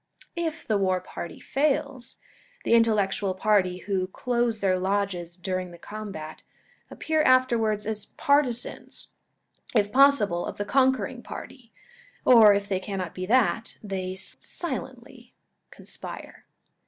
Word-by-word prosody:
If 330 Hz, -1 st, -3 dB
the 215 Hz, -2 st, +1 dB
war 185 Hz, -1 st, +1 dB
party 170 Hz, -2 st, -8 dB
fails, 280 Hz, -3 st, -1 dB, 0.5 s
the -, -, +1 dB
intellectual 205 Hz, -4 st, +2 dB
party, 185 Hz, -2 st, +2 dB
who 190 Hz, -2 st, -1 dB
close 235 Hz, +2 st, -1 dB
their 185 Hz, -2 st, +1 dB
lodges 185 Hz, -3 st, -2 dB
during 185 Hz, 0 st, -3 dB
the 175 Hz, -, -12 dB
combat, 195 Hz, -5 st, -8 dB, 0.5 s
appear 315 Hz, -1 st, 0 dB
afterwards 235 Hz, -6 st, +3 dB
as 215 Hz, -1 st, -2 dB
partisans, 280 Hz, -4 st, 0 dB, 0.6 s
if 205 Hz, -2 st, +3 dB
possible, 255 Hz, -10 st, +4 dB
of -, -, -6 dB
the 205 Hz, -, -2 dB
conquering 260 Hz, +1 st, +1 dB
party, 250 Hz, -2 st, -10 dB, 0.5 s
or 225 Hz, -4 st, +8 dB
if 200 Hz, 0 st, -2 dB
they 190 Hz, -2 st, 0 dB
cannot 185 Hz, -3 st, -5 dB
be 185 Hz, 0 st, -5 dB
that, 230 Hz, -1 st, +2 dB
they 185 Hz, -2 st, -4 dB
silently 255 Hz, -, -6 dB, 0.3 s
conspire. -, -, -9 dB
215 Hz, 120 wpm, -26 LUFS, 190-255 Hz, 0.6 s, or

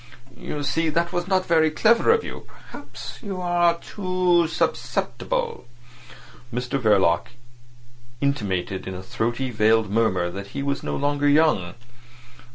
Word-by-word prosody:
"You 145 Hz, +4 st, -5 dB
see, 160 Hz, +3 st, 0 dB
that 170 Hz, +3 st, 0 dB
was 175 Hz, 0 st, -2 dB
not 185 Hz, -1 st, +1 dB
very 160 Hz, -2 st, +3 dB
clever 225 Hz, -, +3 dB
of 455 Hz, 0 st, +4 dB
you. -, -, -8 dB, 0.2 s
Perhaps -, -, -9 dB
you 195 Hz, -3 st, -5 dB
are 175 Hz, -1 st, +2 dB
too 185 Hz, -4 st, +1 dB
susceptible." 475 Hz, -, -2 dB, 0.8 s
Mr 125 Hz, +3 st, -2 dB
Verloc 95 Hz, -7 st, +3 dB, 0.9 s
intimated 95 Hz, -9 st, -2 dB
in 95 Hz, -, -5 dB
a 90 Hz, -, -7 dB
throaty, 120 Hz, +6 st, -2 dB
veiled 110 Hz, -1 st, +2 dB
murmur 95 Hz, -6 st, +1 dB
that 100 Hz, +2 st, -7 dB
he 140 Hz, -, -2 dB
was 140 Hz, 0 st, -1 dB
no -, -, -3 dB
longer 145 Hz, 0 st, +1 dB
young. 145 Hz, -, +3 dB
145 Hz, 135 wpm, -23 LUFS, 110-175 Hz, 0.9 s, of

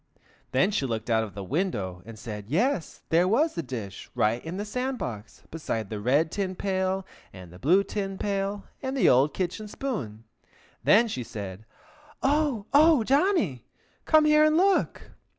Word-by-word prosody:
Then 185 Hz, +11 st, +3 dB
she 140 Hz, -9 st, 0 dB
looked 115 Hz, 0 st, -3 dB
out 110 Hz, 0 st, +3 dB
of 100 Hz, -4 st, -8 dB
the 100 Hz, -, -5 dB
window, 100 Hz, -, -2 dB
and 115 Hz, -1 st, -9 dB
said 105 Hz, -2 st, -7 dB
yes, 190 Hz, -, 0 dB
there 170 Hz, +3 st, +4 dB
was 290 Hz, -, +2 dB
the 170 Hz, -, -3 dB
dish, 115 Hz, -, -7 dB
right 110 Hz, +3 st, +1 dB
in 165 Hz, +3 st, -5 dB
the 205 Hz, -, -3 dB
sand 255 Hz, +4 st, -2 dB
box, 110 Hz, -, -7 dB
beside 115 Hz, -10 st, -4 dB
the 105 Hz, -, -3 dB
red 140 Hz, +9 st, +2 dB
tin 190 Hz, -2 st, -2 dB
pail 190 Hz, 0 st, -1 dB, 0.3 s
and 90 Hz, -2 st, -12 dB
the 90 Hz, -, -13 dB
blue 180 Hz, -, +4 dB
tin 195 Hz, -1 st, -4 dB
pail 200 Hz, 0 st, -2 dB, 0.2 s
and 265 Hz, 0 st, -3 dB
the -, -, +4 dB
old 135 Hz, +4 st, +4 dB
kitchen 190 Hz, +4 st, -3 dB
spoon. 140 Hz, -, -5 dB, 0.6 s
Then 230 Hz, +3 st, +5 dB
she 130 Hz, -, -4 dB
said, 100 Hz, -2 st, -7 dB, 0.6 s
"Oh! 280 Hz, -6 st, +1 dB
oh, 300 Hz, -3 st, +6 dB
Johnny, 270 Hz, -, +1 dB, 0.4 s
come 310 Hz, -1 st, +5 dB
here 305 Hz, 0 st, +5 dB
and 310 Hz, +1 st, +4 dB
look!" 385 Hz, +2 st, +1 dB
185 Hz, 170 wpm, -27 LUFS, -, 0.6 s, oh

